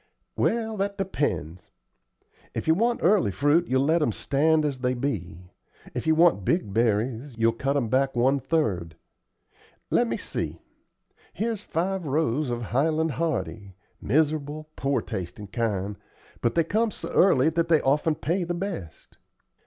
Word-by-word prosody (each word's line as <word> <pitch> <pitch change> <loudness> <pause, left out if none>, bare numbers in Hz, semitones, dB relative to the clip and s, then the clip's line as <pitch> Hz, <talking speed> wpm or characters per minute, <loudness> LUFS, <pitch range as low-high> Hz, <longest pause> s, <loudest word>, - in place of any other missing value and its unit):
"Well, 225 -2 0
that 200 +1 -2
depends. 145 - -2 0.9
If - - -3
you 160 - +6
want 235 +7 +1
early 190 - +4
fruit, 145 - +2
you'll 130 +1 +2
let 160 +3 +3
'em 135 - +2
stand 155 +7 +2
as 140 -3 -2
they 125 0 0
be; 90 - -4 0.4
if - - -4
you 160 - +4
want 165 - +4
big 105 - 0
berries, 115 +3 0
you'll 115 0 +3
cut 135 +4 -1
'em 125 -5 0
back 135 +3 +1
one 130 +4 +3
third. 95 - -1 1.0
Let - - +3
me - - -2
see. - - -4 0.7
Here's 220 +1 -2
five 185 -1 -2
rows 145 -1 0
of 120 0 -3
Highland 155 +7 +1
Hardy; 115 - -3 0.3
miserable 155 +3 0
poor 135 0 0
tastin' 90 +3 -6
kind; 105 -3 -2 0.4
but 120 - 0
they 165 - +4
come 220 +7 +1
so - - -7
early 155 -6 +4
that 165 +1 0
they 165 -2 +4
often 150 +3 +2
pay 175 +6 -1
the 175 0 -2
best. 170 - -6
145 Hz, 155 wpm, -26 LUFS, 115-165 Hz, 1.0 s, you